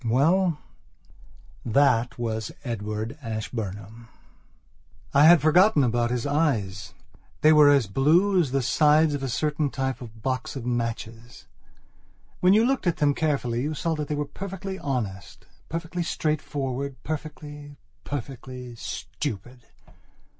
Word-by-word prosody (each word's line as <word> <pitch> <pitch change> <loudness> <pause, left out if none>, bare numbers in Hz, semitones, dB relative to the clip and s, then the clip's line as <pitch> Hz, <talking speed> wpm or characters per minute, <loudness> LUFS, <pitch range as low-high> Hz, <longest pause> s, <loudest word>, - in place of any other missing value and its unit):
Well, 160 +9 +2 1.1
that 125 0 +2
was 110 -3 -3
Edward 110 +2 -4
Ashburnham. 110 -1 -6 1.1
I 140 +2 +6
had 165 -3 +7
forgotten 170 +1 +5
about 120 -1 +1
his 120 -1 -2
eyes. 105 - -1 0.5
They 155 +1 +6
were 150 -1 +7
as 140 -4 +4
blue 165 - +3
as 150 - -1
the 135 0 0
sides 150 +5 +4
of 145 - -3
a 135 - -3
certain 145 +4 0
type 130 -1 -3
of 110 -2 -11
box 130 +1 -2
of 130 -3 -6
matches. 115 -1 -4 0.9
When 180 +1 +5
you 220 +2 +5
looked 265 -6 0
at 175 - +1
them 145 -1 +3
carefully 135 -6 -1
you 150 +3 -2
saw 165 +3 -1
that 150 -2 -3
they 150 - -2
were 145 0 -2
perfectly 195 +5 -6
honest, 110 -9 -4 0.2
perfectly 170 +2 -4
straightforward, 140 -4 -2
perfectly, 145 -1 -7 0.3
perfectly 130 -2 -7
stupid. 120 +3 -6
140 Hz, 130 wpm, -25 LUFS, 115-155 Hz, 1.1 s, had